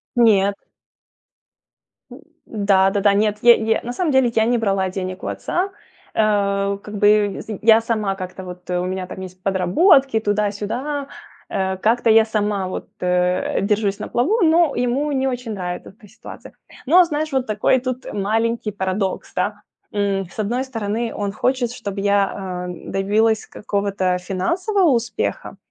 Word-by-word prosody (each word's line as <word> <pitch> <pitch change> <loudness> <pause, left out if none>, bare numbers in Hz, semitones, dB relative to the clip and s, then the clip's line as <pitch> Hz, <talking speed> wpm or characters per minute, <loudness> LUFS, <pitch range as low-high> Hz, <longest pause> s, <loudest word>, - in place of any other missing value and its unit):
Нет. 200 -4 +4 1.6
М, - - -11 0.3
да 200 -3 +2
да-да. 200 0 +2
Нет, 210 +1 0
е 240 - +9 0.2
е - - -2
на 245 +1 -4
самом 330 +1 0
деле 260 -3 +3
я 220 - +3
не 240 +1 +2
брала 195 -4 0
денег 185 0 -5
у - - -3
отца. 370 +3 -2 0.5
Ау, 200 -2 +1
как 210 +1 -10
бы, 205 0 +3
сынь, 215 -3 -7
я 225 0 +6
сама 215 -4 -1
как-то 185 0 -7
вот, 180 0 -10
э, 180 - 0
у 180 - -2
меня 185 0 -3
там - - -8
есть 185 0 -10
подработки, 225 - +3
туда-сюда. 210 +7 -2 0.4
Э, 190 0 -1
как-то 230 +4 +2
я 220 0 +7
сама 205 -3 -1
вот, 185 - -6
э, 180 +1 0
держусь 205 -1 0
на - - -5
плаву, 375 - +1
но 330 0 +4
ему 260 +5 0
не 265 -1 0
очень 245 -3 -3
нравит 180 -2 -5
эта 210 +2 -16
ситуация. 215 +4 -12 0.3
Но 355 +6 +6
знаешь, 310 -1 -3
вот 265 -2 0
такой 215 +4 +2
тут 255 0 -4
маленький 220 +2 -1
парадокс, 190 0 -3
та. 205 +3 -2 0.3
М, 200 -2 -1
с - - -17
одной 235 +5 -1
стороны, 225 -2 -3
он 200 -1 -2
хочет, 250 +1 0
чтоб 205 -4 -6
я, 200 0 +2
ам, 180 -2 -6
добилась 215 +3 +1
какого-то 200 -3 -1
финансового 340 - 0
успеха, 240 -1 -2
210 Hz, 160 wpm, -20 LUFS, 195-240 Hz, 1.6 s, е